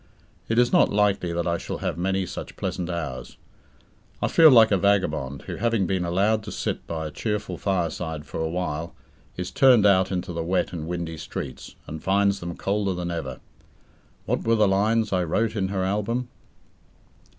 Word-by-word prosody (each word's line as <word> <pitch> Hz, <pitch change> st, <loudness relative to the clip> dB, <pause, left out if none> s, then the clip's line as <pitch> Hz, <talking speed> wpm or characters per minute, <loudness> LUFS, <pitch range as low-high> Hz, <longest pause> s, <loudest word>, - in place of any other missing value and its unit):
It 115 Hz, -, 0 dB
is 120 Hz, 0 st, +3 dB
not -, -, +5 dB
likely 100 Hz, -4 st, +1 dB
that 85 Hz, 0 st, -1 dB
I 85 Hz, 0 st, 0 dB
shall -, -, -5 dB
have -, -, -2 dB
many 95 Hz, +2 st, 0 dB
such -, -, -7 dB
pleasant 90 Hz, -1 st, -3 dB
hours. 80 Hz, -7 st, -5 dB, 0.8 s
I -, -, 0 dB
feel 160 Hz, -1 st, +7 dB
like 115 Hz, -5 st, +7 dB
a 100 Hz, -, +4 dB
vagabond 80 Hz, -9 st, 0 dB
who, -, -, -6 dB
having 115 Hz, -4 st, +1 dB
been 95 Hz, 0 st, -1 dB
allowed 100 Hz, +6 st, +1 dB
to 105 Hz, -, -6 dB
sit -, -, -3 dB
by 80 Hz, -1 st, -4 dB
a 75 Hz, -, -5 dB
cheerful 105 Hz, +5 st, -3 dB
fireside 85 Hz, -4 st, -2 dB
for -, -, -6 dB
a 80 Hz, 0 st, -1 dB
while, 85 Hz, -2 st, -3 dB, 0.4 s
is 90 Hz, 0 st, -4 dB
turned 125 Hz, -6 st, +5 dB
out 95 Hz, -2 st, +4 dB
into 90 Hz, -1 st, -3 dB
the 85 Hz, -, -3 dB
wet 90 Hz, +2 st, 0 dB
and 80 Hz, -2 st, -5 dB
windy 85 Hz, -2 st, -4 dB
streets, 75 Hz, -, -7 dB
and 80 Hz, 0 st, -8 dB
finds 100 Hz, +1 st, +2 dB
them 85 Hz, 0 st, -6 dB
colder 100 Hz, -1 st, -1 dB
than 90 Hz, 0 st, -3 dB
ever. 70 Hz, -7 st, -5 dB, 0.8 s
What -, -, -1 dB
were 115 Hz, 0 st, +3 dB
the 105 Hz, -2 st, +4 dB
lines 105 Hz, +2 st, +2 dB
I 90 Hz, -1 st, +2 dB
wrote 110 Hz, +7 st, 0 dB
in 95 Hz, -3 st, 0 dB
her 95 Hz, -1 st, -2 dB
album? 105 Hz, +6 st, -1 dB
95 Hz, 185 wpm, -25 LUFS, 85-105 Hz, 0.8 s, feel